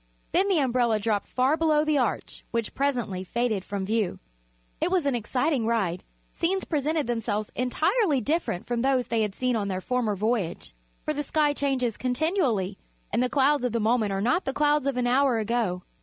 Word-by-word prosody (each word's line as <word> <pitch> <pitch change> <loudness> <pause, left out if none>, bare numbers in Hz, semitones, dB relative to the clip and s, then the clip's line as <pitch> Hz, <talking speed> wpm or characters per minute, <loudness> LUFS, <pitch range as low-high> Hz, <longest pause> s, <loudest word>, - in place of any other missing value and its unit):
Then 385 +2 +3
the 385 -3 +2
umbrella 240 -5 +2
dropped 210 -1 -1
far 260 +4 +2
below 310 -2 +2
the 305 -2 +2
arch, 240 -5 -2
which 230 -2 -2
presently 240 -9 -1
faded 220 0 -1
from 200 -1 -4
view. 215 -2 0 0.6
It - - +2
was 360 -4 +1
an 280 - +2
exciting 245 +2 0
ride. 190 -6 0 0.3
Scenes 380 +3 -1
presented 305 0 0
themselves 225 -3 -2
entirely 280 - +1
different 290 - -1
from 240 -1 -1
those 255 -2 +1
they 230 -1 +1
had 210 -2 -1
seen 255 -1 0
on 205 -3 -1
their 185 -1 -2
former 230 0 -1
voyage, 205 - -2 0.3
for 305 - 0
the 295 - -2
sky 295 0 +1
changes 265 -5 -1
continually 250 - 0 0.3
and 230 - +2
the 250 - +1
clouds 285 0 +3
of 250 -2 -1
the 230 - +1
moment 220 -1 +2
are 195 0 -1
not 250 - +2
the 270 - -1
clouds 295 -1 +2
of 275 -2 -1
an 250 - +1
hour 255 0 +3
ago. 215 -5 -1
245 Hz, 190 wpm, -26 LUFS, 215-285 Hz, 0.6 s, Then